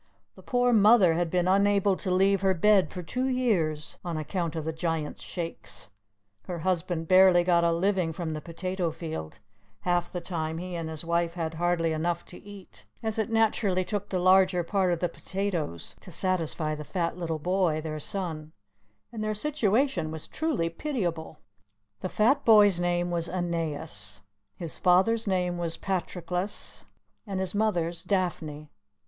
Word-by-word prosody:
The -, -, -15 dB
poor 245 Hz, -1 st, +2 dB
mother 210 Hz, -4 st, +6 dB
had 170 Hz, 0 st, 0 dB
been 180 Hz, +1 st, +1 dB
unable 200 Hz, 0 st, +3 dB
to 190 Hz, -, -4 dB
leave 195 Hz, +1 st, +3 dB
her 190 Hz, -1 st, +2 dB
bed 200 Hz, +2 st, +4 dB
for 180 Hz, -, -6 dB
two 255 Hz, +9 st, -2 dB
years, 185 Hz, -, 0 dB
on 170 Hz, -2 st, -3 dB
account 165 Hz, +1 st, -3 dB
of 160 Hz, -2 st, -3 dB
the 160 Hz, -, -2 dB
Giant's 160 Hz, -2 st, -3 dB
Shakes; 165 Hz, -, -6 dB, 0.6 s
her 175 Hz, -3 st, -4 dB
husband 175 Hz, -2 st, -1 dB
barely 185 Hz, -1 st, +6 dB
got 175 Hz, -1 st, +3 dB
a 170 Hz, -, +3 dB
living 180 Hz, 0 st, +1 dB
from 160 Hz, -1 st, -4 dB
the 155 Hz, -, -5 dB
potato 180 Hz, +2 st, -3 dB
field; 160 Hz, -, -6 dB, 0.4 s
half 175 Hz, -1 st, 0 dB
the 180 Hz, -, -3 dB
time 160 Hz, -2 st, -3 dB
he 180 Hz, +1 st, -5 dB
and 165 Hz, -1 st, -4 dB
his 160 Hz, 0 st, -4 dB
wife 170 Hz, 0 st, 0 dB
had 165 Hz, -2 st, -3 dB
hardly 165 Hz, -1 st, +1 dB
enough 170 Hz, +2 st, -1 dB
to 180 Hz, -, -11 dB
eat, 200 Hz, -2 st, -12 dB, 0.2 s
as 220 Hz, 0 st, -2 dB
it 220 Hz, -, 0 dB
naturally 215 Hz, -4 st, +2 dB
took 205 Hz, 0 st, -3 dB
the 185 Hz, -, -1 dB
larger 185 Hz, 0 st, +4 dB
part 185 Hz, +1 st, +1 dB
of 170 Hz, -, -1 dB
the 175 Hz, -, +2 dB
potatoes 175 Hz, -, -4 dB
to -, -, -13 dB
satisfy 165 Hz, -3 st, 0 dB
the 150 Hz, 0 st, -5 dB
fat 170 Hz, +2 st, -2 dB
little 165 Hz, -2 st, -2 dB
boy, 175 Hz, -1 st, +1 dB
their 155 Hz, -1 st, -4 dB
son, 160 Hz, -3 st, -4 dB, 0.6 s
and 220 Hz, -2 st, -4 dB
their 215 Hz, 0 st, -1 dB
situation 260 Hz, -, +1 dB
was 160 Hz, -1 st, -5 dB
truly 305 Hz, -, -1 dB
pitiable. 170 Hz, -, -3 dB, 0.6 s
The 185 Hz, -, -4 dB
fat 265 Hz, +9 st, +2 dB
boy's 205 Hz, -5 st, +6 dB
name 175 Hz, 0 st, 0 dB
was 170 Hz, -1 st, -1 dB
Aeneas, 160 Hz, -, -3 dB, 0.3 s
his 170 Hz, -3 st, -6 dB
father's 190 Hz, +5 st, +3 dB
name 180 Hz, -2 st, 0 dB
was 170 Hz, -1 st, -1 dB
Patroclus, 180 Hz, 0 st, -3 dB, 0.4 s
and 195 Hz, -2 st, -3 dB
his 190 Hz, -1 st, -2 dB
mother's 175 Hz, -6 st, 0 dB
Daphne. 155 Hz, -6 st, -2 dB
175 Hz, 165 wpm, -28 LUFS, 165-195 Hz, 0.6 s, mother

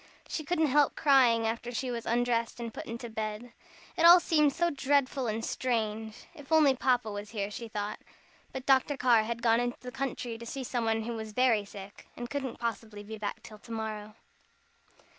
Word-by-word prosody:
She 310 Hz, -, -4 dB
couldn't 320 Hz, +1 st, +1 dB
help 290 Hz, 0 st, +3 dB
crying 250 Hz, -6 st, +4 dB
after 230 Hz, +2 st, -2 dB
she 250 Hz, +1 st, -3 dB
was 235 Hz, -1 st, -5 dB
undressed 235 Hz, 0 st, 0 dB
and 230 Hz, -2 st, -5 dB
put -, -, -7 dB
into 235 Hz, +1 st, -6 dB
bed. 220 Hz, +1 st, -5 dB, 0.4 s
It 330 Hz, -, 0 dB
all 345 Hz, +1 st, +10 dB
seemed 300 Hz, -4 st, +3 dB
so 345 Hz, +3 st, 0 dB
dreadful 275 Hz, -2 st, +1 dB
and 225 Hz, +1 st, -2 dB
strange. 220 Hz, -3 st, -2 dB
If 290 Hz, -3 st, -14 dB
only 300 Hz, -4 st, +5 dB
Papa 245 Hz, -4 st, +1 dB
was 205 Hz, 0 st, -6 dB
here, 205 Hz, -2 st, -3 dB
she 230 Hz, +2 st, -6 dB
thought. 210 Hz, -1 st, -4 dB, 0.5 s
But 265 Hz, 0 st, -6 dB
Dr. 270 Hz, +1 st, +3 dB
Carr 245 Hz, -3 st, +4 dB
had 235 Hz, +1 st, -4 dB
gone 230 Hz, -1 st, +4 dB
into 245 Hz, 0 st, -2 dB
the 250 Hz, -, -8 dB
country 245 Hz, -3 st, -4 dB
to 235 Hz, -, -8 dB
see 270 Hz, +2 st, -5 dB
somebody 225 Hz, -3 st, -1 dB
who 235 Hz, +1 st, -4 dB
was 220 Hz, -1 st, -6 dB
very 230 Hz, -4 st, +3 dB
sick, 200 Hz, 0 st, -11 dB
and 240 Hz, 0 st, -6 dB
couldn't 270 Hz, -4 st, -3 dB
possibly 225 Hz, -3 st, -4 dB
be 220 Hz, +1 st, -8 dB
back 210 Hz, -, -4 dB
till 215 Hz, -1 st, -12 dB
to 230 Hz, +2 st, -14 dB
morrow. 215 Hz, -1 st, -5 dB
235 Hz, 195 wpm, -30 LUFS, 220-265 Hz, 0.5 s, all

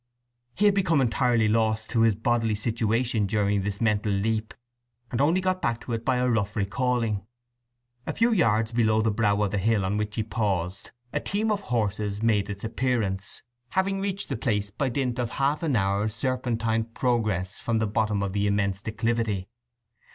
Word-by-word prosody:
He 205 Hz, -, +2 dB
had 205 Hz, -, +6 dB
become 180 Hz, -6 st, +2 dB
entirely 120 Hz, -2 st, +2 dB
lost 110 Hz, 0 st, +1 dB
to 115 Hz, -, +2 dB
his 115 Hz, -2 st, +4 dB
bodily 115 Hz, 0 st, +1 dB
situation 115 Hz, 0 st, 0 dB
during 100 Hz, -1 st, +1 dB
this 100 Hz, 0 st, -3 dB
mental 105 Hz, -2 st, +1 dB
leap, 110 Hz, +2 st, -1 dB, 0.6 s
and 120 Hz, -, 0 dB
only 165 Hz, +6 st, +3 dB
got 185 Hz, 0 st, 0 dB
back 115 Hz, -1 st, 0 dB
to 120 Hz, -, -5 dB
it 115 Hz, 0 st, -2 dB
by 130 Hz, +1 st, +2 dB
a 125 Hz, 0 st, +1 dB
rough 110 Hz, -4 st, 0 dB
recalling. 110 Hz, -1 st, 0 dB, 0.8 s
A -, -, -1 dB
few 230 Hz, +1 st, +3 dB
yards 115 Hz, -, +2 dB
below 110 Hz, -2 st, +2 dB
the 110 Hz, -, +2 dB
brow 105 Hz, -1 st, +1 dB
of 100 Hz, -, 0 dB
the 105 Hz, -, 0 dB
hill 105 Hz, 0 st, +2 dB
on 100 Hz, +2 st, 0 dB
which 105 Hz, 0 st, -2 dB
he 110 Hz, -, 0 dB
paused 95 Hz, -4 st, -2 dB, 0.2 s
a -, -, +1 dB
team 215 Hz, +2 st, -1 dB
of 205 Hz, -1 st, 0 dB
horses 105 Hz, -, -1 dB
made 105 Hz, -3 st, +2 dB
its 100 Hz, -1 st, -6 dB
appearance, 110 Hz, -5 st, -1 dB, 0.3 s
having 195 Hz, +1 st, 0 dB
reached 195 Hz, 0 st, -3 dB
the 135 Hz, -, -2 dB
place 105 Hz, -4 st, -1 dB
by 135 Hz, +6 st, -1 dB
dint 125 Hz, -1 st, -1 dB
of 120 Hz, -2 st, -1 dB
half 140 Hz, +4 st, 0 dB
an 155 Hz, -6 st, 0 dB
hour's 100 Hz, +1 st, +1 dB
serpentine 115 Hz, -3 st, -1 dB
progress 110 Hz, -6 st, -1 dB
from 115 Hz, -1 st, 0 dB
the 110 Hz, -, +1 dB
bottom 105 Hz, -1 st, 0 dB
of 95 Hz, -1 st, -2 dB
the 100 Hz, 0 st, +1 dB
immense 100 Hz, -1 st, 0 dB
declivity. 110 Hz, -3 st, -1 dB
110 Hz, 185 wpm, -26 LUFS, 105-125 Hz, 0.8 s, had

